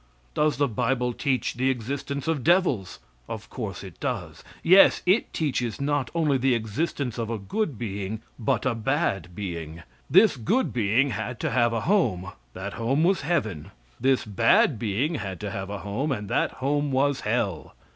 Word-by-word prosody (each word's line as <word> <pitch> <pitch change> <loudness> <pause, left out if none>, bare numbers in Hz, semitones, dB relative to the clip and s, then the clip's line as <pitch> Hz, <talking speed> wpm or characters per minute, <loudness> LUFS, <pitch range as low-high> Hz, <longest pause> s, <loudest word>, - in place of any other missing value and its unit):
Does 150 -2 +1
the 145 0 +2
bible 125 +1 0
teach 130 0 -1
the 130 +2 +1
existence 135 +4 -3
of 155 -6 0
devils? 160 - +2 0.3
Of - - -7
course - - -5
it - - -11
does. - - -4 0.2
Yes, 185 +3 +6
it 190 +6 +3
teaches 125 -7 -1
not 140 -2 0
only 150 -5 +2
the 130 -1 +3
existence 120 +3 -2
of 115 -1 -2
a 115 - -2
good 145 - -2
being, 105 0 -4 0.2
but 115 - 0
a 130 - +2
bad 115 - -1
being. 85 -4 -6 0.3
This 190 -4 +6
good 230 - 0
being 120 +4 +2
had 110 +2 -4
to - - -1
have 120 -2 +3
a 115 -1 -1
home; 95 - +1 0.2
that 100 +2 -5
home 130 +6 +1
was 185 +2 +3
heaven. 120 - -1 0.3
This 130 +1 +2
bad 120 - +3
being 120 - 0
had 95 -2 -5
to 105 -1 -4
have 95 0 -5
a 100 -1 -5
home; 125 +9 -1
and 105 -6 -3
that - - +1
home 145 +2 -1
was 135 +1 +2
hell. 105 -7 -2
125 Hz, 175 wpm, -26 LUFS, 105-145 Hz, 0.3 s, Yes